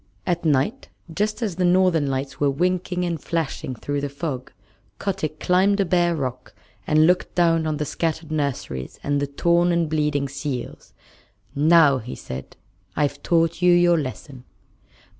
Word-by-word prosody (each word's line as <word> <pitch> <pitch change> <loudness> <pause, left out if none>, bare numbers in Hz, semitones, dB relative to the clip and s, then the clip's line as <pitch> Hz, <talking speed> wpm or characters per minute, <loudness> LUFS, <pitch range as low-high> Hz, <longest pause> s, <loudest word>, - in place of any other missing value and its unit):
At 175 -2 -1
night, 145 -4 0 0.2
just 215 +6 -1
as 195 -6 -3
the 185 - 0
Northern 175 -4 +3
Lights 135 0 -3
were 145 - +3
winking 180 +4 -1
and 170 -4 -3
flashing 160 -5 -3
through 145 +4 -3
the 145 - -3
fog, 140 -3 -5 0.5
Kotick 180 -6 -3
climbed 195 +3 +2
a 195 - +3
bare 175 -1 +2
rock 130 -4 -5 0.3
and 155 +1 +4
looked 180 +2 +1
down 165 -2 +3
on 155 -1 -1
the 150 - -2
scattered 160 0 -3
nurseries 135 - -3
and 145 0 0
the 145 - -1
torn 170 +5 +2
and 170 -1 +1
bleeding 150 -2 0
seals. 140 -2 -6 0.6
"Now," 150 -2 +5
he 125 +2 -7
said, 65 +1 -8 0.4
"I've 145 -1 -1
taught 165 0 +1
you 180 0 +5
your 175 -1 +4
lesson." 130 -2 -7
155 Hz, 160 wpm, -23 LUFS, 140-175 Hz, 0.6 s, Now